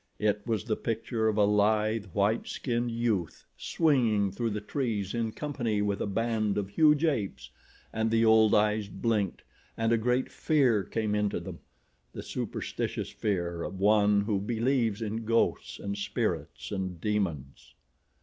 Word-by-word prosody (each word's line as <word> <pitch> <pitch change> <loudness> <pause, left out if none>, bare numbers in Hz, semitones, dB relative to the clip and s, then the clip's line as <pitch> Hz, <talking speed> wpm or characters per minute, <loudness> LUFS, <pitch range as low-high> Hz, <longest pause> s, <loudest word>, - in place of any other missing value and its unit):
It 105 -1 +1
was 110 -3 0
the 110 - -1
picture 115 0 -2
of 110 -1 0
a 105 - +5
lithe, 105 +1 +2
white 100 +4 0
skinned 120 -2 -2
youth 115 -7 -2
swinging 115 - +2
through 115 +4 -2
the 105 0 -3
trees 105 -3 -2
in 115 -2 -1
company 120 -7 -2
with 100 -1 -1
a - - -1
band 110 0 0
of 100 -2 -2
huge 150 +6 +4
apes, 95 - -2 0.4
and 110 0 0
the 115 0 +3
old 110 -1 +5
eyes 105 0 +2
blinked 105 -2 -1 0.3
and 115 +1 +2
a 115 - +3
great 125 +3 0
fear 130 - +2
came 110 0 -2
into 105 -1 0
them—the - - -12
superstitious - - -4
fear 85 -5 -2
of 95 - -5
one 105 0 +4
who 100 -1 0
believes 115 0 0
in 110 +1 -3
ghosts 115 +1 0
and 100 0 -4
spirits 65 -10 -3
and 95 -3 -3
demons. 85 -10 -3
110 Hz, 150 wpm, -29 LUFS, 100-115 Hz, 0.4 s, a